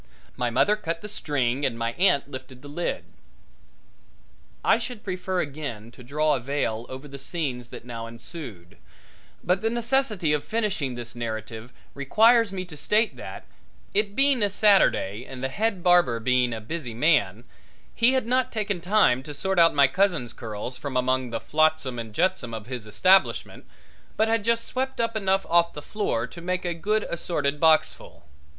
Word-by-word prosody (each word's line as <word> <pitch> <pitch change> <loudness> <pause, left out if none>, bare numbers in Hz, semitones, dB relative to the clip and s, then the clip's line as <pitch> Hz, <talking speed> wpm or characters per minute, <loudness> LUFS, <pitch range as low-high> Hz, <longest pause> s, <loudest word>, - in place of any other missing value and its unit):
My 125 -1 -1
mother 205 - +3
cut 165 -5 -4
the 210 - -6
string 140 - -1
and 120 -4 0
my 115 0 -1
aunt 175 -3 +2
lifted 130 -1 -9
the - - -9
lid. 160 +5 -3 1.6
I - - +4
should 245 -5 -7
prefer 185 -1 -2
again 135 -7 -6
to 120 - -15
draw 150 +4 +1
a 135 - 0
veil 120 -3 -2
over 130 +3 -8
the 140 0 -10
scenes 130 -8 -4
that - - -10
now 115 -2 -6
ensued, 115 - -10 0.7
but 180 +2 +1
the 225 - +1
necessity 235 - +1
of 150 - 0
finishing 200 - -2
this 120 -1 -7
narrative 115 0 -6 0.2
requires 225 - +4
me 185 -1 -4
to 170 -4 -11
state 215 +9 +1
that - - -8 0.5
it 205 0 0
being 275 -3 +3
a 205 - +3
Saturday 190 - +3
and 130 -1 -9
the 130 - 0
head 200 +3 -1
barber 175 -10 +4
being 125 +1 +2
a 115 - -4
busy 120 +1 -5
man, 120 - +2 0.5
he 240 +2 +3
had 260 -3 +1
not 255 +2 +1
taken 205 -5 -2
time 180 -9 +3
to 145 +2 -8
sort 190 +4 0
out 165 -2 +5
my 140 -1 +6
cousin's 160 -4 +1
curls 115 +2 -6
from 130 0 -4
among 130 0 +1
the 115 -1 -3
flotsam 155 -5 +1
and 110 -2 -8
jetsam 125 -10 0
of 110 -2 -7
his 120 -3 -6
establishment, 185 - +2 0.5
but 220 - +3
had 225 -1 +1
just 230 +1 +1
swept 265 +1 -3
up 230 -1 0
enough 195 -2 +1
off 170 0 +3
the - - -7
floor 145 - -2
to 170 - -11
make 180 +1 -2
a 175 - 0
good 210 +6 0
assorted 150 -4 -2
boxful. 160 - +2
150 Hz, 175 wpm, -25 LUFS, 125-195 Hz, 1.6 s, my